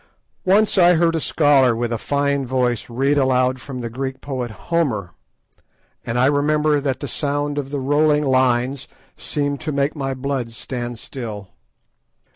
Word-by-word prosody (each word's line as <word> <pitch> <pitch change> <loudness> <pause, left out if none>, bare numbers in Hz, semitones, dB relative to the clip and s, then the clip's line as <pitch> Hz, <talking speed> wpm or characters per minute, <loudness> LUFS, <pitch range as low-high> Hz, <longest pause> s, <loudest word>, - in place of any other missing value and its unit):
Once 200 +2 +4
I 175 0 +6
heard 165 0 +3
a 165 - 0
scholar 140 -7 +3
with 120 0 -2
a 115 - -2
fine 140 0 0
voice 125 -2 0
read 135 +4 +1
aloud 130 -1 +2
from 130 -2 -7
the 115 - -4
Greek 130 +2 -4
poet 130 -4 -4
Homer, 110 - -2 0.9
and 115 - -3
I 125 - +4
remember 150 +1 +2
that 135 -2 -2
the 140 - -3
sound 145 +2 -1
of 135 -1 -5
the 145 - -3
rolling 150 +2 +2
lines 130 0 +1 0.3
seemed 145 -1 -2
to 155 - -3
make 140 +2 0
my 135 -2 -3
blood 130 -3 -3
stand 120 0 -5
still. 110 -5 -7
135 Hz, 160 wpm, -21 LUFS, 125-145 Hz, 0.9 s, I